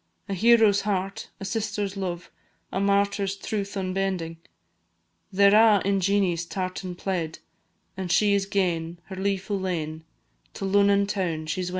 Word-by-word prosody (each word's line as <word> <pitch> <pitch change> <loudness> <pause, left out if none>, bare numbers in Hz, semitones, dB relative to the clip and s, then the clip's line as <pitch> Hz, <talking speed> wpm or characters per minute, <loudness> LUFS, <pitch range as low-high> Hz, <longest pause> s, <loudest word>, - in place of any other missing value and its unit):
A 200 - -3
hero's 220 0 +5
heart 195 +1 -3
a 195 - -6
sister's 205 -1 -2
love 175 -3 -4 0.4
A - - -1
martyr's 200 0 +1
truth 200 0 -4
unbending; 185 -3 -2 0.9
They 200 +1 +5
're 200 - +5
a' 215 -2 +6
in 195 0 +2
Jeanie's 190 -3 +1
tartan 185 0 -4
plaid 175 -4 -3 0.6
And 185 -2 -4
she 205 +4 +4
is 195 -1 +1
gane, 175 -4 -1
her 190 - -6
leefu' 195 +1 -2
lane, 160 -4 -3 0.5
To - - -4
Lunnon 200 +1 +4
toun 180 -6 -2
she 175 +4 -2
's 180 - -3
wending! - - -2
195 Hz, 155 wpm, -25 LUFS, 180-200 Hz, 0.9 s, a